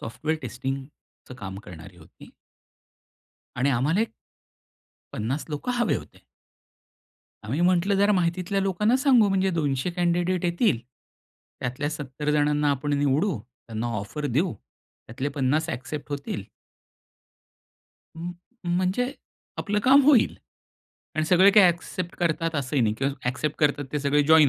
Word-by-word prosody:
Software 140 Hz, +8 st, -3 dB
टेस्टिंगचं 130 Hz, +2 st, -7 dB
काम 95 Hz, -1 st, -6 dB
करणारी 90 Hz, +1 st, -11 dB
होती. 80 Hz, -2 st, -16 dB, 1.3 s
आणि 135 Hz, +3 st, +2 dB
आम्हाला 140 Hz, -, +2 dB
एक 225 Hz, -, +1 dB, 1.1 s
50 125 Hz, +8 st, -2 dB
लोकं 150 Hz, +12 st, -2 dB
हवे 240 Hz, -, +2 dB
होते. -, -, -12 dB, 1.2 s
आम्ही 130 Hz, +9 st, -2 dB
म्हंटलं 180 Hz, +2 st, +3 dB
जरा 200 Hz, +2 st, +4 dB
माहितीतल्या 180 Hz, +2 st, 0 dB
लोकांना 195 Hz, +5 st, +2 dB
सांगू, 260 Hz, -6 st, +5 dB
म्हणजे 190 Hz, 0 st, +2 dB
200 145 Hz, -2 st, 0 dB
कॅन्डीडेट 175 Hz, +1 st, +1 dB
येतील. 175 Hz, -, +2 dB, 0.8 s
त्यातल्या 130 Hz, +4 st, -2 dB
70 150 Hz, 0 st, -4 dB
जणांना 150 Hz, 0 st, +2 dB
आपण 140 Hz, +1 st, -1 dB
निवडू. 145 Hz, -, +1 dB
त्यांना 115 Hz, -1 st, -7 dB
ऑफर 145 Hz, +10 st, -4 dB
देऊ 150 Hz, +7 st, +1 dB
त्यातले 125 Hz, +5 st, -8 dB
50 145 Hz, +3 st, 0 dB
ॲक्सेप्ट 145 Hz, +3 st, -6 dB
होतील 140 Hz, -8 st, -4 dB, 1.7 s
म 170 Hz, +2 st, -5 dB, 0.5 s
म्हणजे 190 Hz, +9 st, 0 dB, 0.5 s
आपलं 205 Hz, 0 st, 0 dB
काम 275 Hz, +2 st, +7 dB
होईल 275 Hz, -5 st, +5 dB, 0.8 s
आणि 155 Hz, 0 st, +1 dB
सगळे 185 Hz, +4 st, +6 dB
काही 205 Hz, -2 st, +7 dB
ॲक्सेप्ट 175 Hz, +1 st, -2 dB
करतात 165 Hz, -1 st, 0 dB
असंही 140 Hz, -2 st, 0 dB
नाही 105 Hz, -2 st, +1 dB
किंवा 135 Hz, +1 st, 0 dB, 0.2 s
ॲक्सेप्ट 140 Hz, +4 st, -2 dB
करतात 145 Hz, -1 st, +2 dB
ते 150 Hz, -, 0 dB
सगळे 145 Hz, +1 st, +2 dB
जॉईन 155 Hz, 0 st, +6 dB
150 Hz, 125 wpm, -25 LUFS, 135-180 Hz, 1.7 s, काम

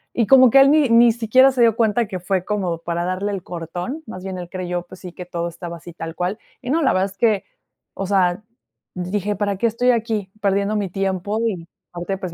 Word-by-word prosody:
Y 230 Hz, -4 st, +1 dB
como 260 Hz, -1 st, +7 dB
que 275 Hz, -, +7 dB
él, 275 Hz, -, +6 dB
ni 300 Hz, -5 st, +4 dB
ni 230 Hz, 0 st, +6 dB
siquiera 255 Hz, +4 st, +4 dB
se 255 Hz, -2 st, -1 dB
dio 225 Hz, -2 st, +5 dB
cuenta, 225 Hz, 0 st, +1 dB
que 185 Hz, -3 st, -5 dB
fue 185 Hz, 0 st, -1 dB
como 190 Hz, -5 st, -1 dB
para 170 Hz, 0 st, -3 dB
darle 190 Hz, +3 st, -2 dB
el 195 Hz, -3 st, -4 dB
cortón, 175 Hz, -, -6 dB
más 185 Hz, -4 st, -9 dB
bien 190 Hz, -1 st, -5 dB
él 175 Hz, -1 st, -6 dB
creyó, 180 Hz, -2 st, -4 dB
pues 185 Hz, -, -13 dB
sí, 180 Hz, -2 st, -9 dB
que 180 Hz, -, -8 dB
todo 170 Hz, -1 st, -3 dB
estaba 170 Hz, 0 st, -7 dB
así, 170 Hz, +2 st, -11 dB
tal 165 Hz, -1 st, -6 dB
cual. 180 Hz, +4 st, -2 dB, 0.2 s
Y 250 Hz, -, -7 dB
no, 320 Hz, +2 st, +2 dB
la 265 Hz, -, +3 dB
verdad 185 Hz, +1 st, +2 dB
es 195 Hz, -, -18 dB
que, 215 Hz, -4 st, +2 dB, 0.5 s
o 195 Hz, -, -3 dB
sea, 185 Hz, 0 st, +1 dB, 0.5 s
dije: 195 Hz, +3 st, -2 dB
"¿Para 200 Hz, -1 st, -1 dB
qué 235 Hz, -, -1 dB
estoy 245 Hz, +3 st, +1 dB
aquí 220 Hz, -4 st, -2 dB
perdiendo 200 Hz, +1 st, +1 dB
mi 200 Hz, -3 st, -1 dB
tiempo? 195 Hz, +3 st, -2 dB
Y 170 Hz, -6 st, -4 dB, 0.2 s
aparte, 175 Hz, +2 st, -4 dB
pues, 180 Hz, -3 st, -5 dB
195 Hz, 235 wpm, -21 LUFS, 180-225 Hz, 0.5 s, como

